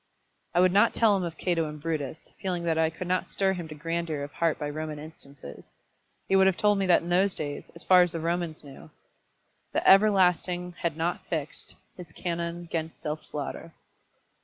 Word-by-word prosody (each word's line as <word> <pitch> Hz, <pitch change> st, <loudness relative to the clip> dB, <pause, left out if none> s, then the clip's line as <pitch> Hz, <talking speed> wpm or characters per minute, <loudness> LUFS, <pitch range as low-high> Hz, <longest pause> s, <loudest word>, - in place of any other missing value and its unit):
I -, -, +5 dB
would 185 Hz, 0 st, +5 dB
not 205 Hz, +5 st, +4 dB
tell 220 Hz, -3 st, +4 dB
him 195 Hz, -, 0 dB
of 170 Hz, -2 st, -4 dB
Cato 165 Hz, -4 st, 0 dB
and 150 Hz, 0 st, -8 dB
Brutus, 155 Hz, -1 st, -4 dB
feeling 180 Hz, -3 st, -2 dB
that 165 Hz, -1 st, +1 dB
I 160 Hz, 0 st, +3 dB
could 165 Hz, +3 st, -7 dB
not 185 Hz, +1 st, 0 dB
stir 195 Hz, -1 st, +1 dB
him 175 Hz, -3 st, -5 dB
to 155 Hz, -, -9 dB
grandeur 165 Hz, -1 st, -3 dB
of 145 Hz, -, -7 dB
heart 165 Hz, -2 st, 0 dB
by 150 Hz, -, -3 dB
Roman 155 Hz, +1 st, -4 dB
instances. 140 Hz, -, -11 dB, 0.5 s
He 195 Hz, -, +2 dB
would 190 Hz, 0 st, +6 dB
have 190 Hz, -, +2 dB
told 205 Hz, -1 st, +3 dB
me 195 Hz, -, 0 dB
that 175 Hz, -, +5 dB
in 170 Hz, -, -6 dB
those 185 Hz, +2 st, +3 dB
days, 145 Hz, -2 st, -4 dB
as 170 Hz, -, -8 dB
far 185 Hz, -1 st, +7 dB
as 175 Hz, -1 st, +2 dB
the 165 Hz, -, -2 dB
Romans 170 Hz, -1 st, -2 dB
knew, 140 Hz, -2 st, -12 dB, 0.8 s
"the -, -, 0 dB
Everlasting 180 Hz, -3 st, +4 dB
had 165 Hz, -2 st, -1 dB
not 170 Hz, +2 st, -2 dB
fixed 155 Hz, -3 st, -4 dB, 0.2 s
His 175 Hz, -4 st, -10 dB
canon 170 Hz, 0 st, -3 dB
'gainst 165 Hz, -1 st, -4 dB
self 150 Hz, 0 st, -4 dB
slaughter." 150 Hz, +3 st, -6 dB
170 Hz, 200 wpm, -27 LUFS, 155-180 Hz, 0.8 s, far